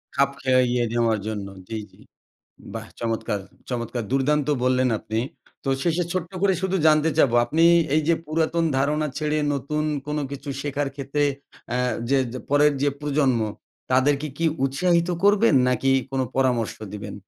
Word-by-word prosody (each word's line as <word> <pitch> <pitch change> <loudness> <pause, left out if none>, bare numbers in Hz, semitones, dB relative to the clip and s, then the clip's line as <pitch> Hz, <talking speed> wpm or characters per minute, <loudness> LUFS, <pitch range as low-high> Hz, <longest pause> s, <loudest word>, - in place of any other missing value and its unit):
খাপ 140 -1 +3
খেইয়ে 125 -2 +2
নেওয়ার 115 -2 +2
জন্য, 105 -2 -4 0.2
জি, 110 - -4
জি। - - -22 0.8
বাহ! - - -5
চমৎকার, 115 -3 -2 0.3
চমৎকার 120 0 -3
দুর্দান্ত 145 +2 +1 0.2
বললেন 130 0 +3
আপনি। 110 +1 -3 0.4
তো - - -3
শেষে 175 0 +1
ছোট্ট 180 -2 -3
করে 195 -2 +4
শুধু 190 0 0
জানতে 155 +1 +4
চাবো। 125 -6 +4
আপনি 155 +7 0 0.3
এই 155 - +3
যে 170 - +5
পুরাতন 165 +2 0
ধারণা 150 +2 +1
ছেড়ে 155 0 0 0.2
নতুন 150 +3 -2 0.2
কোন 150 0 -2
কিছু 140 +1 -7
শেখার 145 -1 -2
ক্ষেত্রে 140 +1 -2 0.5
অ্যা 125 - 0 0.3
যে 140 - +4 0.3
পরের 145 +1 +5
যে 145 - +4
প্রজন্ম, 140 -5 +1 0.5
তাদেরকে 140 +3 +2
কি 165 - +1 0.2
উৎসাহিত 170 +5 +2 0.2
করবেন 205 -4 +5
নাকি 125 +2 +1 0.2
কোন 135 -1 -1 0.2
পরামর্শ 125 -4 +1 0.2
দিবেন? 100 -1 -6
140 Hz, 150 wpm, -24 LUFS, 125-155 Hz, 0.8 s, যে